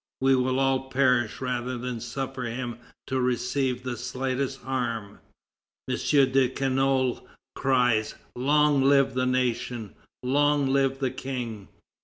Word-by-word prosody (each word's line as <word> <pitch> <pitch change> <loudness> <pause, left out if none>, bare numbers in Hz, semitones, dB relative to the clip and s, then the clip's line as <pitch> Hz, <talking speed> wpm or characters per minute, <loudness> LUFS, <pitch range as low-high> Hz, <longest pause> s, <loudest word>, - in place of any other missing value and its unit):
We 135 0 +4
will 130 0 +1
all 135 0 +1
perish 125 -4 +2
rather 125 0 -2
than 125 -1 -4
suffer 130 +2 -4
him 120 0 -4 0.3
to 130 0 -1
receive 125 +1 0
the 125 -1 -3
slightest 130 +2 -3
harm." 120 -6 -3 0.7
M. - - 0
de 135 -3 +3
Canolle 135 -1 0 0.3
cries: 125 -5 +1 0.2
"Long 145 +2 +3
live 135 0 +4
the 130 0 0
nation! 120 -4 -1 0.3
Long 145 +2 +2
live 135 -1 +2
the 135 -2 -1
King!" 120 -6 -5
130 Hz, 125 wpm, -26 LUFS, 125-135 Hz, 0.7 s, We